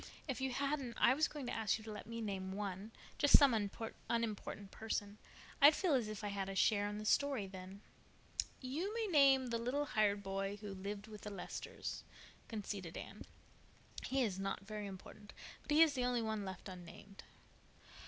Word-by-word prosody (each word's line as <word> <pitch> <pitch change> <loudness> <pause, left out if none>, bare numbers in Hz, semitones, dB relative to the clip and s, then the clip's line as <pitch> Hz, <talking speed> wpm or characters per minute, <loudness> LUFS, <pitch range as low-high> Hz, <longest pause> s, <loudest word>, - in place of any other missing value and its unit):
"If 265 -3 -2
you 265 - +1
hadn't 275 -2 -1
I 250 - +6
was 305 +3 +3
going 290 -3 -6
to 245 - -3
ask 220 -2 +1
you 220 - -11
to 220 - -7
let 210 - -7
me 230 0 -4
name 190 -3 -3
one—just 205 +7 +3
some 280 -4 +6 0.6
unimportant 215 -3 -2
person. 210 -2 -3 0.4
I'd 290 +2 +10
feel 365 -6 +2
as 245 -5 +2
if 215 0 -5
I 205 - -1
had 195 -1 -2
a 195 - -4
share 205 +1 +3
in 205 - -4
the 215 - -5
story 275 -2 +2
then." 190 +1 -9 0.8
"You 300 +10 -2
may 460 -1 0
name 275 - +5
the 230 - 0
little 260 +5 0
hired 205 -5 +2
boy 195 +1 -2
who 205 -1 -6
lived 200 +2 -5
with 215 -2 -10
the 210 - -5
Lesters," 195 -3 -5 0.4
conceded 200 -5 -5
Anne. - - -8 0.8
"He 265 0 +2
is 195 -5 -1
not 195 -1 -2
very 210 -1 -4
important, 200 +2 -10 0.3
but - - -22
he 300 +2 +8
is 315 -3 +3
the 250 -3 0
only 245 -2 +1
one 220 -2 -1
left 190 0 -6
unnamed." 185 +2 -10
215 Hz, 185 wpm, -37 LUFS, 200-260 Hz, 0.8 s, I'd